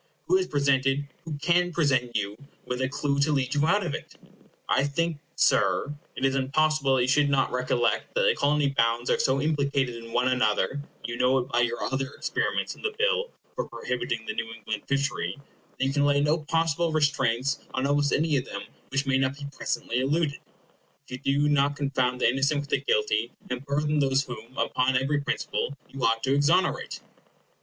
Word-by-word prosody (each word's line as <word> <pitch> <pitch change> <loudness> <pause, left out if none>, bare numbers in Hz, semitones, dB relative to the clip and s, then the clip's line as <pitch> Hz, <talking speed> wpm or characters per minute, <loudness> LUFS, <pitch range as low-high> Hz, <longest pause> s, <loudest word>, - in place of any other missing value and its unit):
Who 370 - +4
has 375 - -1
presented, 140 0 +1 0.2
who 155 -3 -4
can 175 +4 +2
present 130 -8 +1
you 105 -1 -1 0.3
with 125 +1 -3
a 130 - 0
clue 140 0 -1
to 145 +2 +3
lead 135 -2 0
you 145 +1 +2
out 205 +2 +2
of 145 - -2
it? - - -7 0.5
I - - +2
think, 160 +2 -1 0.2
Sir, 145 - +2 0.2
it - - -1
is 135 - +2
impossible 140 +1 +2
that 125 - +2
you - - 0
should 145 +2 +3
not 135 -1 +2
recollect 125 - 0
that - - +2
the 485 -2 +4
Colony 145 0 +2
bounds 115 -2 +1
are - - +2
so 135 +1 +2
implicated 140 -5 0
in 115 - -11
one 125 +2 +2
another,—you 120 +1 -1
know 130 +2 +3
it 130 0 -2
by 120 - +1
your 120 0 0
other 135 0 -1
experiments - - -1
in - - -16
the 435 -1 -2
bill - - +1 0.3
for - - -3
prohibiting 120 -2 -3
the - - -3
New 115 0 -4
England 110 -1 -5
fishery,—that 140 -1 -3
you 135 - 0
can 145 0 +2
lay 145 0 +3
no 150 +3 +2
possible 165 +1 0
restraints 140 -3 +1 0.2
on 130 +1 0
almost 145 0 +2
any 155 -1 +2
of 125 - -2
them 100 - -6 0.3
which 135 +1 0
may 135 -1 +2
not 135 +1 0
be 145 - -7
presently 120 - -2
eluded, 145 +2 0 0.7
if 125 0 -6
you 140 +1 +3
do - - +3
not 145 -1 +2
confound 130 -3 0
the - - +4
innocent 140 +4 +2
with 145 - -10
the - - +2
guilty, 435 -2 +1 0.2
and 125 +2 -4
burthen 150 +1 +1
those 135 0 +2
whom, 120 -1 -10
upon 130 0 +1
every 145 +3 0
principle, 140 -1 -2
you 135 - -6
ought 115 0 +2
to 135 - +2
exonerate. 145 +6 +1
140 Hz, 195 wpm, -27 LUFS, 130-150 Hz, 0.7 s, Who